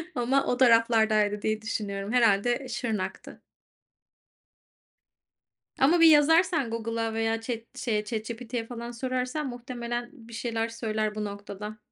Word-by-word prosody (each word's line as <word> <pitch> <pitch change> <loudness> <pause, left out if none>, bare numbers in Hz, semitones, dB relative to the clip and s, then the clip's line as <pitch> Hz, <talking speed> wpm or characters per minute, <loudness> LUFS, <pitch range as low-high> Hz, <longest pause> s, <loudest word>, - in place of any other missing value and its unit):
ama 265 +3 +1
o 245 - 0
taraflardaydı 220 -4 +4
diye 215 +1 -1
düşünüyorum, 205 -2 -4
herhâlde, 235 -1 +3
eee, 270 - -9
Şırnak'tı. 220 -6 -4 2.4
Ama 315 +6 +4
bir 330 - +8
yazarsan 320 -2 +4
Google'a 230 0 -2
veya 225 0 0
chat 230 +2 -6
şeye, 215 -5 0
ChatGPT'ye 230 +1 -4
falan 235 0 -6
sorarsan 255 +4 -2
muhtemelen 240 -1 -5
bir 235 -5 -14
şeyler 230 -1 -2
söyler 215 -2 -2
bu 215 - -3
noktada. 205 +1 -7
230 Hz, 120 wpm, -27 LUFS, 215-245 Hz, 2.4 s, bir